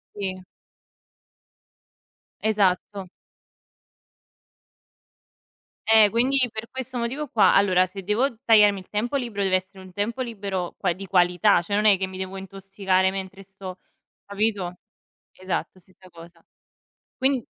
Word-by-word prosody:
Sì. 185 Hz, -2 st, -5 dB, 2.0 s
Esatto. 200 Hz, -2 st, 0 dB, 2.8 s
Eh, 220 Hz, -2 st, +7 dB
quindi 255 Hz, +5 st, +1 dB
per 220 Hz, +1 st, -7 dB
questo 260 Hz, -1 st, -6 dB
motivo 260 Hz, +6 st, -3 dB
qua 210 Hz, -6 st, +4 dB
allora 185 Hz, -2 st, +4 dB
se 195 Hz, +1 st, -9 dB
devo 230 Hz, +5 st, 0 dB
tagliarmi 210 Hz, -3 st, +5 dB
il 185 Hz, -, -14 dB
tempo 235 Hz, +7 st, -1 dB
libero 225 Hz, -6 st, -3 dB
deve 185 Hz, -1 st, +3 dB
essere 185 Hz, +1 st, -11 dB
un 185 Hz, -, -13 dB
tempo 215 Hz, +7 st, -3 dB
libero 200 Hz, -7 st, -4 dB
qua 180 Hz, -3 st, 0 dB
di 195 Hz, +3 st, -9 dB
qualità. 180 Hz, +1 st, +3 dB
Cioè 200 Hz, +4 st, -3 dB
non 210 Hz, -, +1 dB
è 205 Hz, -2 st, +6 dB
che 190 Hz, 0 st, -2 dB
mi 185 Hz, 0 st, -9 dB
devo 190 Hz, +1 st, -5 dB
intossicare 195 Hz, -1 st, -1 dB
mentre 190 Hz, 0 st, -7 dB
sto 190 Hz, -1 st, -10 dB, 0.5 s
capito? 200 Hz, -3 st, -2 dB, 0.6 s
Esatto 185 Hz, 0 st, -5 dB
stessa 185 Hz, +1 st, -20 dB
cosa. 165 Hz, 0 st, -15 dB, 0.8 s
Quindi 265 Hz, -2 st, +1 dB
195 Hz, 125 wpm, -24 LUFS, 185-220 Hz, 2.8 s, Eh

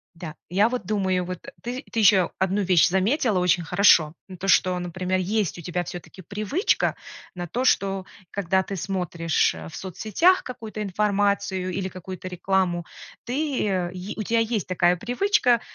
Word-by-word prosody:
Да. 165 Hz, -2 st, -8 dB
Я 200 Hz, +6 st, +3 dB
вот 250 Hz, 0 st, -4 dB
думаю, 190 Hz, -4 st, 0 dB
вот, 180 Hz, 0 st, -5 dB
э, -, -, -7 dB
ты, 250 Hz, +3 st, -5 dB
ты 230 Hz, -, -1 dB
ещё 195 Hz, -4 st, +5 dB
1 190 Hz, +2 st, +1 dB
вещь 180 Hz, -4 st, +4 dB
заметила 205 Hz, -, +1 dB
очень 180 Hz, -1 st, +2 dB
хорошо. 170 Hz, -4 st, +4 dB
Ну, 185 Hz, -1 st, -10 dB
то, 195 Hz, -, -5 dB
что, 185 Hz, -1 st, +4 dB
например, 185 Hz, +1 st, -2 dB
есть 200 Hz, 0 st, -1 dB
у -, -, -7 dB
тебя 175 Hz, +2 st, -2 dB
всё-таки 175 Hz, +2 st, -9 dB
привычка 210 Hz, -, 0 dB, 0.4 s
на 175 Hz, -1 st, -5 dB
то, 245 Hz, +9 st, -2 dB
что 195 Hz, -6 st, +1 dB, 0.3 s
когда 190 Hz, -1 st, +1 dB
ты 195 Hz, -, -5 dB
смотришь, 175 Hz, -4 st, 0 dB
э, 80 Hz, 0 st, -8 dB
в -, -, -11 dB
соцсетях 215 Hz, -, +1 dB
какую-то 220 Hz, -4 st, -7 dB
информацию 200 Hz, -2 st, 0 dB
или 185 Hz, +1 st, -2 dB
какую-то 185 Hz, 0 st, -8 dB
рекламу, 180 Hz, -1 st, 0 dB, 0.4 s
ты 280 Hz, +1 st, -1 dB
э, 180 Hz, -3 st, -1 dB
е 185 Hz, +3 st, -6 dB
у 215 Hz, -, -2 dB
тебя 230 Hz, +3 st, +1 dB
есть 225 Hz, -3 st, -1 dB
такая 180 Hz, -1 st, +3 dB
привычка, 245 Hz, -, +2 dB
190 Hz, 170 wpm, -24 LUFS, 180-215 Hz, 0.4 s, ещё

